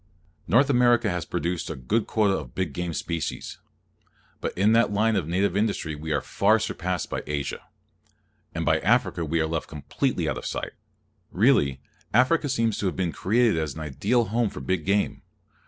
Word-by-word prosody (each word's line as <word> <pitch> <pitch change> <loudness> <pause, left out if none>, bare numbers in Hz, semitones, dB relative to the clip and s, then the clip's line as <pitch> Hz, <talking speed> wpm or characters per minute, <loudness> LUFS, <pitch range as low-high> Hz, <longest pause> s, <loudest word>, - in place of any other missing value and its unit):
North 135 +10 +4
America 120 -4 +4
has 90 -3 -3
produced 85 +2 -2
a 80 - -4
good 85 - -1
quota 105 -3 +2
of 65 -8 -7
big 95 -6 -2
game 90 +3 -3
species; 85 0 -4 0.8
but - - -2
in 100 +3 +4
that 115 -1 +4
line 110 +2 +2
of 85 -6 -1
native 95 +2 +1
industry 100 -7 0
we 80 +1 -6
are 70 -2 +1
far 105 +3 +2
surpassed 90 -5 -2
by - - -3
Asia; 75 -2 -3 1.0
and - - -2
by - - +3
Africa 85 - +1
we 80 +1 0
are 80 - +2
left 80 0 -3
completely 75 -3 -2
out - - -1
of - - -10
sight. - - -4 0.6
Really, 90 - +2 0.3
Africa 140 +5 +3
seems 115 -3 0
to 100 - 0
have 90 - -2
been 90 -3 -1
created 110 -1 +2
as 80 -4 -3
an 80 - -6
ideal 105 - 0
home 115 +1 0
for - - -8
big 80 +4 -2
game. 100 +1 0
95 Hz, 185 wpm, -25 LUFS, 80-110 Hz, 1.0 s, North